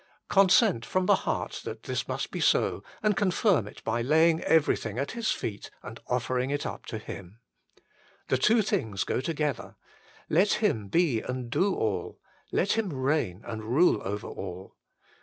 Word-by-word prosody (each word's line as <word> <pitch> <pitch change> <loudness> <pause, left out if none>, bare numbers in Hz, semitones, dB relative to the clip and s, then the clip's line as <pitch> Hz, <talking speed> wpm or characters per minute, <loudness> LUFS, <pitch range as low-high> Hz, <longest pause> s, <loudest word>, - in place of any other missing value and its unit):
Consent 190 - +4
from 185 +7 0
the 205 - +5 0.2
heart - - -2
that - - -7
this - - -3
must - - -3
be - - -4
so, - - +2 0.2
and 210 -1 +3
confirm 185 - +2
it - - -12
by 115 +1 -1
laying 160 +5 +4
everything 140 -8 +2
at 140 +2 -2
His 230 -2 -2
feet 100 -3 -3
and - - -9
offering 125 +1 -1
it 145 0 -2
up - - -6
to 110 - -4
Him. 100 -2 -9 0.9
The 130 - +1
two 220 - +4
things 110 - -1
go - - -1
together: 150 -2 -2 0.5
let 185 +6 +3
Him 120 - 0
be 135 - +2
and 125 -2 -5
do 195 +7 +2
all; 100 -5 -2 0.3
let 200 - +1
Him 220 -3 0
reign 130 - -1
and 110 -1 -5
rule 135 +11 +3
over 105 +2 -4
all. 95 0 -8
135 Hz, 165 wpm, -28 LUFS, 110-180 Hz, 0.9 s, the